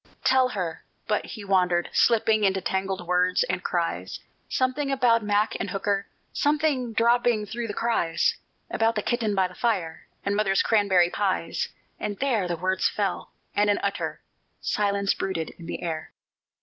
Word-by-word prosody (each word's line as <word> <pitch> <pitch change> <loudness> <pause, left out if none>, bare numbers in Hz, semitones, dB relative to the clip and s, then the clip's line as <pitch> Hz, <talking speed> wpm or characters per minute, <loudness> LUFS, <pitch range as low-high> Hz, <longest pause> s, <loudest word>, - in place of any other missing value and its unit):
"Tell 260 -1 +4
her" 165 -4 -3 0.2
but - - -1
he 215 -4 -8
wandered, 180 -3 +2
slipping 220 -2 +3
Into 190 -1 +3
tangled 190 0 -2
words 180 - +2
and - - -2
cries, - - -2 0.3
Something 265 +2 0
about 245 -4 +3
Mac 210 +1 +1
and 200 - -3
Hooker, 200 +1 -1 0.3
Something 290 -5 +1
dropping 235 -1 +2
through 230 +3 -4
the 205 - -5
cries 225 -8 +1 0.4
About 225 +1 +2
the 210 - -1
kitten 225 -4 0
by 190 -1 +3
the 180 - -14
fire, 180 -8 -2 0.2
And 200 - +1
mother's 195 -2 +2
cranberry 190 -5 +3
pies; 190 -4 -1 0.3
and 205 -1 -3
there 235 -9 +1
The 175 -1 -2
words 185 +2 +1
fell, 200 -3 -2 0.3
and 205 0 +3
an 205 - +2
utter 200 0 -2 0.4
Silence 200 -1 +1
brooded 165 -5 -3
in 165 - -9
the - - -5
air. 160 -2 -4
205 Hz, 160 wpm, -26 LUFS, 185-230 Hz, 0.4 s, Tell